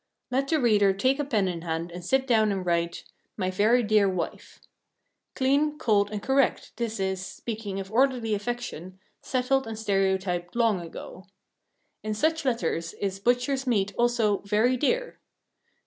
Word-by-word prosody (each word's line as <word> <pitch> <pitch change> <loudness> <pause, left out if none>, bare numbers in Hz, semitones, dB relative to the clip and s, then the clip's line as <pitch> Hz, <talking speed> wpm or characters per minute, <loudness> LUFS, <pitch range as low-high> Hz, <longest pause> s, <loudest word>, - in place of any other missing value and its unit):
Let 270 +2 +1
the 315 +1 +2
reader 210 -6 +4
take 260 +8 +1
a - - +1
pen 220 -9 +1
in 175 -2 -3
hand 165 0 -3
and 175 +1 -8
sit 265 +8 +1
down 220 -4 +3
and 190 -2 -3
write, 170 0 -1 0.3
"My 185 -2 -1
very 220 +6 +3
dear 210 -2 +3
wife." 185 -3 -5 0.8
Clean, 285 +3 +2
cold, 205 -6 +2
and 210 -1 -5
correct 270 0 +1
this 230 -3 -3
is, 190 -1 -1
speaking 210 -1 -5
of 195 +1 -7
orderly 245 -2 +2
affection, 205 -5 -4 0.2
settled 265 0 0
and 225 -1 -5
stereotyped 190 -4 0
long 225 -6 +2
ago. 170 +2 -10 0.7
In 215 0 -3
such 315 +5 0
letters 170 -9 -1
is 195 -1 -3
butcher's 250 +4 0
meat 200 -4 +1
also 235 -4 +2
"very 215 +5 +2
dear." 485 - -1
215 Hz, 155 wpm, -26 LUFS, 190-250 Hz, 0.8 s, reader